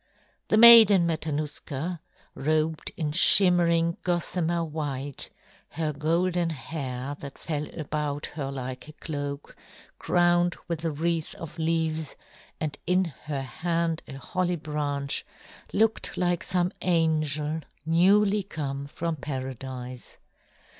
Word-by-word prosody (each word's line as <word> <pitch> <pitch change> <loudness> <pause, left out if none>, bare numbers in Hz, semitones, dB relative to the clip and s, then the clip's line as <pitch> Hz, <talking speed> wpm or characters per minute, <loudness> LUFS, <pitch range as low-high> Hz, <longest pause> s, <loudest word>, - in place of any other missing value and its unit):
The 215 - +3
Maiden 220 -5 +10
Matanuska, 155 0 -3 0.3
robed 155 +2 0
in 155 -3 -1
shimmering 170 -1 +4
gossamer 175 -1 0
white, 145 -3 -4 0.4
her 155 -1 -2
golden 170 +4 +1
hair, 140 -3 -5
that 140 -1 -9
fell 150 -2 -3
about 150 -1 -2
her 140 -3 -4
like 130 0 -6
a 155 - -11
cloak, 145 -2 -6 0.4
crowned 175 0 +3
with 170 -2 -3
a 165 - +1
wreath 160 +1 -1
of 165 0 -9
leaves, 160 -2 -1 0.4
and 150 -2 -3
in 180 +1 +3 0.2
her 145 -3 -3
hand 165 +4 -1
a - - -8
holly 180 +5 -1
branch, 145 -3 -2 0.5
looked 220 +1 +1
like 175 -1 +1
some 180 0 0
angel 155 -3 +1 0.2
newly 195 +5 +4
come 140 -7 -5
from 165 +3 -3
paradise. 130 -3 -6
160 Hz, 115 wpm, -27 LUFS, 145-175 Hz, 0.5 s, Maiden